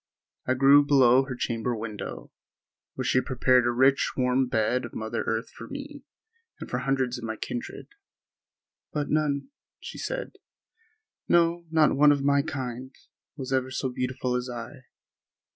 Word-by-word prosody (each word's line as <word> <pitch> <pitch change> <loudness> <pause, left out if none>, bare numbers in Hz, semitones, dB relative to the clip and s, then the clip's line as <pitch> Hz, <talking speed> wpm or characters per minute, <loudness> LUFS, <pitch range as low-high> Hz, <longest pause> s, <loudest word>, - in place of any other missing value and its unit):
I 130 - +2
grew 140 +2 +6
below 135 -2 +5
her 130 -2 -5
chamber 120 0 -2
window, 105 - -7 0.6
where 130 - -3
she 130 0 +3
had - - -4
prepared 125 -1 +3
a - - +2
rich, 130 +3 +3
warm 130 0 +2
bed 120 +2 0
of 120 - -8
mother 110 +1 -3
earth 115 +1 -2
for - - -10
me 285 0 -8 0.6
and - - -7
for 125 - -2
hundreds 130 -2 -1
of - - -11
my 110 -1 -3
kindred. 245 - -6 1.0
"But 150 -1 -3
none," 150 - 0 0.3
she - - -9
said, - - -5 0.9
"no, 170 0 +2
not 160 -2 +3
one 145 +1 +6
of 140 -1 +1
my 140 0 +3
kind, 130 -4 -6 0.4
was 135 -1 -4
ever 130 0 0
so 130 0 -2
beautiful 125 0 -2
as 125 0 -3
I." 120 +1 -8
130 Hz, 160 wpm, -26 LUFS, 125-140 Hz, 1.0 s, grew